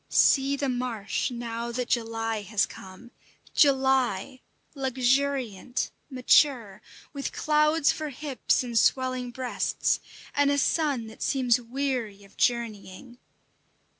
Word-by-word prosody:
See 275 Hz, 0 st, +4 dB
the 280 Hz, 0 st, -2 dB
marsh 245 Hz, -5 st, -2 dB
now 235 Hz, -1 st, -5 dB
that 245 Hz, 0 st, -3 dB
July 225 Hz, -2 st, -1 dB
has 205 Hz, +1 st, +1 dB
come! 190 Hz, +6 st, -12 dB, 0.4 s
July, 265 Hz, -4 st, +2 dB, 0.3 s
luxuriant, 260 Hz, -3 st, 0 dB, 0.2 s
mature, 250 Hz, -5 st, +2 dB, 0.3 s
with 280 Hz, -1 st, -4 dB
clouds 305 Hz, 0 st, +2 dB
for 310 Hz, -1 st, -4 dB
hips 280 Hz, -2 st, -1 dB
and 235 Hz, -2 st, +1 dB
swelling 255 Hz, -1 st, +1 dB
breasts, 250 Hz, 0 st, -1 dB, 0.3 s
and 285 Hz, 0 st, +3 dB
a 285 Hz, -, +2 dB
sun 285 Hz, -4 st, +1 dB
that 220 Hz, 0 st, -13 dB
seems 250 Hz, -2 st, +2 dB
weary 240 Hz, -5 st, -3 dB
of 195 Hz, -, -19 dB
journeying. 235 Hz, 0 st, -2 dB
250 Hz, 110 wpm, -27 LUFS, 230-275 Hz, 0.4 s, See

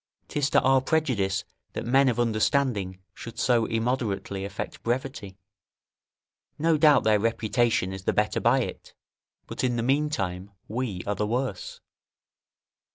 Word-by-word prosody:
'Tis 145 Hz, -1 st, 0 dB
to -, -, +4 dB
our 135 Hz, 0 st, +4 dB
prejudice 120 Hz, -10 st, 0 dB, 0.3 s
that -, -, -4 dB
men 135 Hz, +2 st, +4 dB
of 120 Hz, -1 st, -1 dB
understanding 110 Hz, -4 st, +1 dB, 0.2 s
should 115 Hz, -, -10 dB
so 120 Hz, -2 st, +2 dB
immoderately 115 Hz, -4 st, -2 dB
affect 100 Hz, +1 st, -6 dB
brevity; 120 Hz, -5 st, -3 dB, 1.2 s
no 165 Hz, +1 st, +2 dB
doubt 150 Hz, -2 st, +5 dB
their 105 Hz, -1 st, +3 dB
reputation 115 Hz, -2 st, +1 dB
is 95 Hz, 0 st, -8 dB
the -, -, +3 dB
better 105 Hz, 0 st, +1 dB
by 125 Hz, +3 st, +3 dB
it, -, -, -7 dB, 0.5 s
but -, -, -5 dB
in 125 Hz, -1 st, +1 dB
the 115 Hz, -, -1 dB
meantime 115 Hz, -10 st, -1 dB, 0.2 s
we 110 Hz, -5 st, -3 dB
are 105 Hz, -, 0 dB
the 105 Hz, +1 st, -2 dB
worse. 120 Hz, -3 st, -3 dB
115 Hz, 140 wpm, -26 LUFS, 100-130 Hz, 1.2 s, doubt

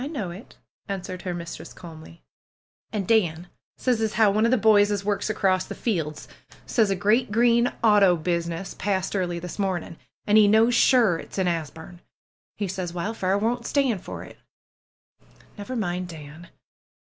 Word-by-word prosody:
know 230 Hz, -, -4 dB
it 190 Hz, +6 st, -12 dB, 0.2 s
!" -, -, -80 dB
answered 185 Hz, -2 st, -5 dB
her 180 Hz, -, -4 dB
mistress 170 Hz, -1 st, -8 dB
calmly. 160 Hz, -, -13 dB, 0.7 s
^'An' 210 Hz, -3 st, -2 dB
Dan 175 Hz, -6 st, +1 dB, 0.3 s
says 245 Hz, -3 st, 0 dB
as 220 Hz, -1 st, 0 dB
how 215 Hz, -2 st, +4 dB
one 215 Hz, +3 st, +2 dB
of -, -, +3 dB
the 255 Hz, -, +4 dB
boys 210 Hz, -2 st, +5 dB
as 200 Hz, -1 st, -2 dB
works 205 Hz, +1 st, -1 dB
across 190 Hz, -3 st, +1 dB
the -, -, -7 dB
fields 160 Hz, -9 st, -3 dB, 0.4 s
says 220 Hz, -4 st, +2 dB
a 195 Hz, -, +1 dB
great 215 Hz, +6 st, +1 dB
green 235 Hz, +2 st, +3 dB
auto 205 Hz, -5 st, +5 dB
business 170 Hz, +2 st, -3 dB
passed 190 Hz, -1 st, -2 dB
early 175 Hz, -3 st, -1 dB
this 180 Hz, +3 st, -7 dB
morning, 185 Hz, -4 st, -2 dB, 0.3 s
an' 210 Hz, 0 st, +4 dB
he 210 Hz, -1 st, +7 dB
knows 220 Hz, +3 st, +4 dB
sure 230 Hz, -9 st, +4 dB
it's -, -, -10 dB
in 190 Hz, -, +1 dB
Asbume. 165 Hz, +1 st, -5 dB, 0.6 s
He 205 Hz, -, -2 dB
says 180 Hz, -2 st, -4 dB
Wildfire 190 Hz, +1 st, -1 dB
won't 235 Hz, +3 st, -1 dB
stand 260 Hz, -9 st, +1 dB
for -, -, -8 dB
it." -, -, -14 dB, 1.2 s
^^Never 230 Hz, +5 st, -6 dB
mind 180 Hz, -4 st, -2 dB
Dan! 160 Hz, 0 st, -11 dB
195 Hz, 170 wpm, -24 LUFS, 175-220 Hz, 1.2 s, he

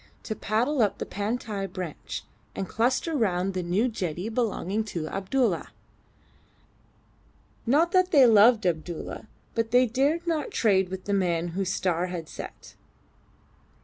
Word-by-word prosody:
to 220 Hz, -, -4 dB
paddle 240 Hz, +8 st, 0 dB
up 210 Hz, -3 st, +2 dB
the -, -, -4 dB
Pantai 205 Hz, -1 st, -3 dB
branch, 180 Hz, -4 st, -6 dB, 0.3 s
and 195 Hz, -, -3 dB
cluster 255 Hz, -, 0 dB
round 195 Hz, -6 st, +1 dB
the 185 Hz, -, -1 dB
new 180 Hz, +8 st, +1 dB
jetty 185 Hz, -4 st, -3 dB
belonging 220 Hz, -3 st, -1 dB
to 170 Hz, -7 st, -4 dB
Abdulla. 225 Hz, +8 st, 0 dB, 2.0 s
Not 315 Hz, +8 st, +3 dB
that 370 Hz, 0 st, +4 dB
they 280 Hz, -7 st, +7 dB
loved 220 Hz, 0 st, +6 dB
Abdulla, 170 Hz, +4 st, -3 dB, 0.3 s
but 230 Hz, -1 st, 0 dB
they 250 Hz, +2 st, +5 dB
dared 280 Hz, +8 st, +1 dB
not 325 Hz, -3 st, -1 dB
trade 190 Hz, -5 st, +2 dB
with 190 Hz, 0 st, -6 dB
the 200 Hz, -, -1 dB
man 175 Hz, -3 st, +1 dB
whose 185 Hz, +2 st, -2 dB
star 180 Hz, -1 st, 0 dB
had 175 Hz, -3 st, -5 dB
set. -, -, -9 dB
210 Hz, 140 wpm, -27 LUFS, 185-245 Hz, 2.0 s, they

